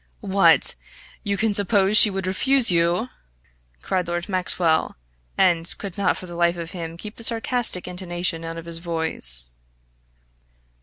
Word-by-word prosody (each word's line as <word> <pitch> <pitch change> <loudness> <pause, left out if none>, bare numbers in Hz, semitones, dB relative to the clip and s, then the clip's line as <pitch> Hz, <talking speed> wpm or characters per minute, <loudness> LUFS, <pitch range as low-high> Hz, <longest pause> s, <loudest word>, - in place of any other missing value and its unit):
"What, 195 0 +4 0.5
you 200 -1 -3
can 220 0 -1
suppose 200 0 +1
she 215 - +8
would 195 -1 -5
refuse 245 +6 +3
you!" 175 +7 0 0.7
cried 185 -2 -3
Lord 175 0 -4
Maxwell, 180 -4 0 0.4
and 170 -2 +2
could 195 -3 -9
not 200 -3 -1
for - - -10
the 175 - -11
life 170 0 0
of 165 0 -8
him 165 -3 -8
keep 210 +4 -10
the 230 - -10
sarcastic 230 -4 +1
intonation 175 -2 -4
out 165 0 -7
of 165 - -9
his 165 -1 -4
voice. 160 - 0
180 Hz, 150 wpm, -21 LUFS, 170-200 Hz, 0.7 s, she